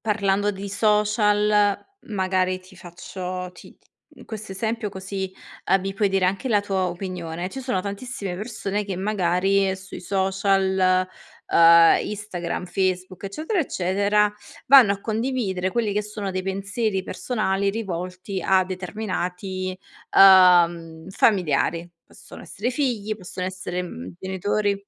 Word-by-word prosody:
parlando 205 -1 +1
di 200 +1 -7
social, 210 0 +2 0.3
magari 185 -2 0
ti 185 0 -18
faccio 180 +1 -7
ti - - -15
t - - -36 0.3
mhmm, - - -14
questo 215 -3 -7
esempio, 220 +2 -2
così, 190 0 -5 0.4
uhm, 190 - +5
mi 195 +1 -4
puoi 205 +1 +1
dire 195 -1 +1
anche 195 +7 -1
la 210 -3 +3
tua 195 -2 -1
opinione. 175 -1 -5
Ci 270 - -8
sono 250 -8 -1
tantissime 200 -1 -5
persone 210 -1 -3
che, 195 -3 -4
magari, 195 0 +1
sui 190 -1 -10
social, 190 -1 +1 0.5
uhm, 170 0 +7
Instagram, 200 -5 -4
Facebook 185 0 -2
eccetera, 310 - -3
eccetera, 205 - +1 0.3
vanno 255 -7 +8
a 200 - -6
condividere, 220 -5 -2
quelli 225 -4 0
che 210 - 0
sono 210 -1 -5
dei 185 0 -3
pensieri 195 +1 -2
personali 200 -5 -1
rivolti 185 -2 -5
a 190 -1 +4
determinati, 185 0 -4 0.4
uhm, 175 -3 +6
familiari. 170 -4 +1 0.2
Possono - - -14
essere 230 +6 -3
figli, 235 -6 -2
possono 185 -2 -6
essere, 185 -1 -4
mhmm, 90 - -8
genitori 200 +2 -1
195 Hz, 130 wpm, -23 LUFS, 185-210 Hz, 0.5 s, vanno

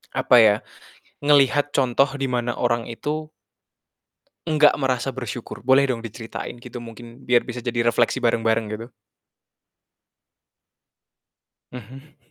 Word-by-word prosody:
Apa 130 -1 +3
ya, 110 -2 +6 0.7
ngelihat 145 0 +3
contoh 135 0 +3
di 135 -2 -3
mana 120 -1 -1
orang 120 -1 -1
itu 150 +6 -5 1.2
nggak 150 -2 +5
merasa 130 -1 -1
bersyukur, 120 -3 -7
boleh 135 +1 +4
dong 120 - -3
diceritain, 115 +2 -7
gitu? 125 -1 -9
Mungkin, 115 0 -12
biar 120 -1 +4
bisa 125 0 -5
jadi 120 -1 -1
refleksi 120 +2 +1
bareng-bareng, 115 -1 +1
gitu. 110 +2 -6 2.8
Mhm. 130 +5 -12
125 Hz, 110 wpm, -22 LUFS, 115-135 Hz, 2.8 s, ya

